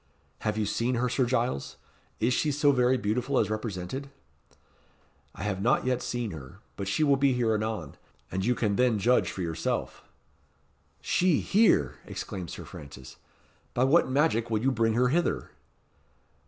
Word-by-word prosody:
"Have 110 -1 -2
you 110 - +1
seen 115 +5 0
her, 125 +1 +1
Sir 125 +1 +1
Giles? 120 - -1 0.4
Is 120 +3 +2
she 150 +4 +1
so 145 0 +3
very 125 -1 +3
beautiful 125 +5 -1
as - - +2
represented?" 110 +5 -4 1.3
"I - - -7
have 100 -2 -2
not 120 +4 +2
yet 125 -1 0
seen 120 -3 -3
her; 70 -6 -10 0.2
but 100 - -5
she 100 +11 +1
will 140 -2 +4
be 135 -1 +3
here 120 -3 +1
anon. 110 -8 -3 0.3
And 95 +1 -2
you 125 +4 +2
can 105 -4 0
then 125 -3 +3
judge 120 +5 +3
for 95 - -4
yourself." 80 -1 -3 1.0
"She 180 -4 +2
here!" 195 - +3
exclaimed 90 -4 -6
Sir - - -8
Francis. 70 -3 -11 0.6
"By 125 - +3
what 140 +5 +4
magic 130 -4 +1
will 110 -2 +1
you 135 - +3
bring 115 -2 +1
her 125 +1 +3
hither?" 170 +6 0
120 Hz, 165 wpm, -28 LUFS, 100-130 Hz, 1.3 s, will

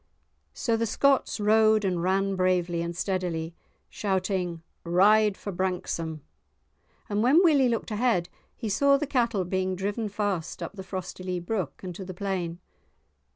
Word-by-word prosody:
So 230 -3 0
the 230 0 0
Scotts 275 +2 +2
rode 215 0 +4
and 180 -3 0
ran 195 +2 +1
bravely 180 -2 +1
and 170 0 -4
steadily, 180 -4 -2 0.3
shouting 185 -4 -2 0.2
"Ride 200 +4 +4
for 200 - -5
Branksome," 175 -4 -3 0.9
and 205 0 0
when 280 - +5
Willie 285 -7 +5
looked 230 -1 -2
ahead 215 -5 +1 0.3
he 230 - -5
saw 280 +7 +4
the 300 - -2
cattle 235 -8 0
being 185 +1 -1
driven 205 +4 -2
fast 200 -5 -2
up - - -6
the 200 - -8
Frostylee 185 -1 -5
brook, 190 -7 -3
and 180 -1 -5
to 190 - -7
the 185 -1 -8
plain. 180 -3 -3
190 Hz, 150 wpm, -27 LUFS, 180-215 Hz, 0.9 s, when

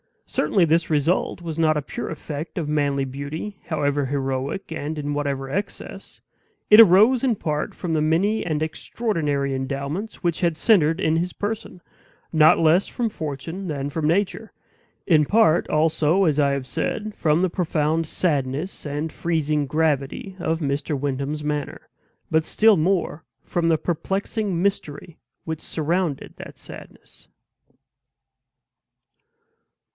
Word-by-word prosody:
Certainly 190 -4 +2
this 165 +1 +2
result 160 +4 +1
was 165 -2 -5
not 155 -1 +3
a 150 - 0
pure 140 - -6
effect 155 +1 -6
of 160 -4 -2
manly 145 -2 +1
beauty, 140 +9 -6
however 145 -3 0
heroic, 135 +5 -3
and 155 0 -4
in 145 0 -3
whatever 140 -2 -2
excess; 200 +8 -6 0.5
it 210 - +9
arose 220 +5 +7
in 250 -4 +2
part 150 -5 -3
from 175 -3 -3
the 155 - +1
many 180 +8 +1
and 155 -2 -1
extraordinary 155 - -2
endowments 140 +11 -4
which 170 -2 0
had 170 -3 +1
centered 165 -4 +3
in 155 +1 +2
his 175 +2 -2
person, 205 -3 -5 0.5
not 155 -1 +6
less 165 +4 +3
from 240 -2 -2
fortune 165 +2 -5
than 140 -3 -3
from 150 +1 -1
nature; 200 +6 0 0.5
in 155 -4 +4
part 205 -3 +3
also, 160 +3 +2
as 155 -4 +2
I 140 -1 +3
have 140 -1 -2
said, 210 - -3
from 155 -1 +1
the 185 - +2
profound 165 -2 0
sadness 150 +1 -2
and 145 +2 -3
freezing 155 -3 -1
gravity 155 +5 -1
of 165 -1 -1
Mr. 140 0 -1
Wyndham's 140 +2 -3
manner; 150 -1 -4 0.4
but 160 0 +2
still 220 -1 +4
more 170 -1 0 0.2
from 170 -1 -1
the 165 -1 +3
perplexing 195 +3 -2
mystery 170 -5 -3 0.2
which 160 -1 -5
surrounded 165 -1 -2
that - - -10
sadness. - - -13
160 Hz, 140 wpm, -23 LUFS, 145-180 Hz, 0.5 s, it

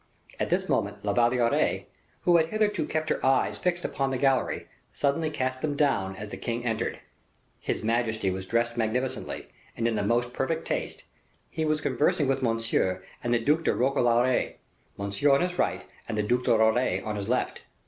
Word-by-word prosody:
At - - -1
this - - +1
moment - - -1
La 100 - +1
Valliere, 120 +1 +2 0.4
who 175 -1 +5
had 160 -1 +3
hitherto 210 -4 0
kept 155 0 -1
her - - -1
eyes 135 0 +2
fixed 175 -1 -1
upon 135 -1 -1
the 135 - -1
gallery, 135 -1 +1 0.2
suddenly 150 +3 0
cast 130 -3 -2
them 150 -2 -1
down 130 -10 +1
as 105 +2 -7
the - - -6
king 120 0 -3
entered. 115 -1 -1 0.6
His - - -3
majesty 110 -3 +1
was 95 0 -5
dressed 115 +1 +1
magnificently 120 +3 -2 0.3
and 115 - +1
in 115 - +1
the 105 - 0
most 120 +4 +1
perfect 160 +5 -1
taste; - - -3 0.5
he 160 - -1
was 155 -1 +1
conversing 145 0 +2
with 135 0 +1
Monsieur 115 -6 0 0.2
and 120 - -1
the 120 - +4
Duc 150 +8 +2
de - - +2
Roquelaure, 125 -1 +2 0.4
Monsieur 100 +8 0
on 135 - +4
his 180 0 -2
right, - - 0 0.2
and 110 - -2
the 105 - +1
Duc 125 +4 +1
de 115 - +4
Roquelaure 110 +3 +2
on 105 -1 -2
his 100 +1 -4
left. 125 - 0
125 Hz, 190 wpm, -27 LUFS, 115-145 Hz, 0.6 s, who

